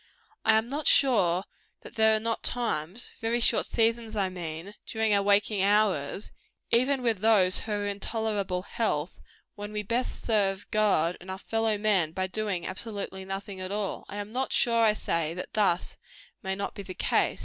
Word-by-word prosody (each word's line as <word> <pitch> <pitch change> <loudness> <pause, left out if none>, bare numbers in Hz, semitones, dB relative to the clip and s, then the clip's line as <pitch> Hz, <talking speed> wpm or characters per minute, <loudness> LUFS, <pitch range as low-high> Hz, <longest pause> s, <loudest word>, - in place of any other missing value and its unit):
I 220 0 +5
am 220 +1 0
not 290 +4 -3
sure 190 -10 +4 0.4
that - - -12
there 220 -1 +4
are - - +1
not 230 +1 -2
times 225 -4 -3
very 230 +1 0
short 235 - +2
seasons, 225 -1 +1
I 195 -2 +1
mean 175 +1 -6
during 220 -1 +1
our 200 - +4
waking 200 0 +2
hours, 200 -4 +1 0.4
even 255 +2 +2
with 230 -5 +1
those 195 -4 +4
who 220 - -6
are 205 0 -1
in 200 0 -3
tolerable 205 -4 -2
health, 180 -7 -2 0.3
when 205 0 -7
we 210 0 -3
best 235 +5 -2
serve 200 -3 +1
God 195 -6 +2
and 185 - -11
our 190 - -4
fellow 225 +1 0
men 195 -7 +2
by 185 +1 -1
doing 190 -2 -2
absolutely 190 -1 -5
nothing 195 0 -5
at 185 +1 -4
all. 205 -1 -3
I 205 - -6
am 205 +1 -5
not 260 +3 -2
sure, 230 -1 +3
I 215 -1 +5
say, 165 -5 -1
that 180 - -7
thus 195 -5 +1 0.4
may 190 -1 -2
not 200 - -4
be - - -7
the 185 -2 -8
case. - - +1
205 Hz, 185 wpm, -28 LUFS, 190-225 Hz, 0.4 s, I